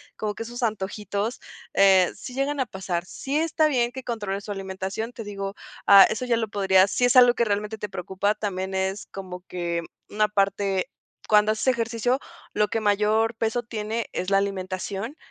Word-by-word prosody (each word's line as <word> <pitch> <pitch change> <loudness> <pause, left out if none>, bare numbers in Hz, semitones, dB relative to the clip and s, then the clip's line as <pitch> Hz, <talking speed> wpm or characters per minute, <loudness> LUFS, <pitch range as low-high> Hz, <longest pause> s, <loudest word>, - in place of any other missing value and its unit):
Como 210 -1 -3
que - - -9
esos 240 +2 -6
antojitos, 210 +1 -2 0.4
eh, 190 -2 +5
sí 250 - -9
llegan 275 +2 -1
a 260 - +2
pasar. 180 -4 -4
Sí 275 +9 -3
está 315 -1 +2
bien 245 -5 +1
que 260 +1 -7
controles 205 -5 -4
tu 210 - -5
alimentación, 195 +3 -4
te 225 - -7
digo, 195 -1 -5 0.3
ah, 200 -1 +10
eso 240 +4 -2
ya 240 -2 +2
lo 225 -1 -1
podría 190 -1 +4
sí 245 - +1
es 245 +2 +3
algo 245 -1 +7
que 235 - +2
realmente 210 +1 -2
te 210 -1 -5
preocupa, 190 +2 -1
también 190 -3 -4
es 190 +1 -1
como 185 -2 -7
que 170 -2 -3 0.3
una 210 0 +2
parte 195 +1 0 0.4
cuando 210 0 +5
haces 220 +4 -2
ejercicio, 235 0 +1 0.4
lo 210 0 +1
que 225 - 0
mayor 215 +2 +2
peso 225 +2 -1
tiene 220 0 -4
es 185 - -2
la 195 - +5
alimentación, 195 +4 -3
210 Hz, 185 wpm, -25 LUFS, 195-230 Hz, 0.4 s, ah